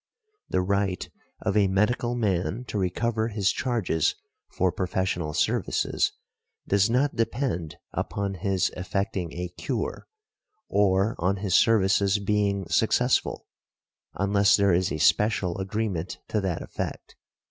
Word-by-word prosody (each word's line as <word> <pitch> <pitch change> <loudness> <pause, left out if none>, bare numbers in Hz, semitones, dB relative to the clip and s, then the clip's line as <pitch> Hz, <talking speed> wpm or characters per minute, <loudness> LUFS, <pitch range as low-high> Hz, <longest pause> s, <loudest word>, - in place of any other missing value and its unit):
The 90 - +1
right 100 -1 0 0.4
of 95 - 0
a 105 -2 +4
medical 120 +5 +1
man 100 0 -1
to 105 - -2
recover 110 +5 0
his 100 -3 +1
charges 105 - 0 0.3
for 95 0 +1
professional 90 -3 -1
services - - +1 0.6
does 100 +2 +3
not 135 +4 +1
depend 115 - -1 0.2
upon 100 -1 -2
his 95 +1 0
effecting 90 -1 -2
a 90 0 -4
cure, 85 - -3 0.6
or 100 +1 +2
on 90 +3 +1
his 100 -2 -2
services 100 -1 +4
being 100 -2 0
successful, - - +1 0.7
unless 100 +1 +3
there 100 -2 +3
is 90 +1 +1
a - - -1
special 95 +2 +2
agreement 95 -3 -2
to 105 - 0
that 90 -4 -2
effect. - - -6
100 Hz, 125 wpm, -26 LUFS, 90-105 Hz, 0.7 s, a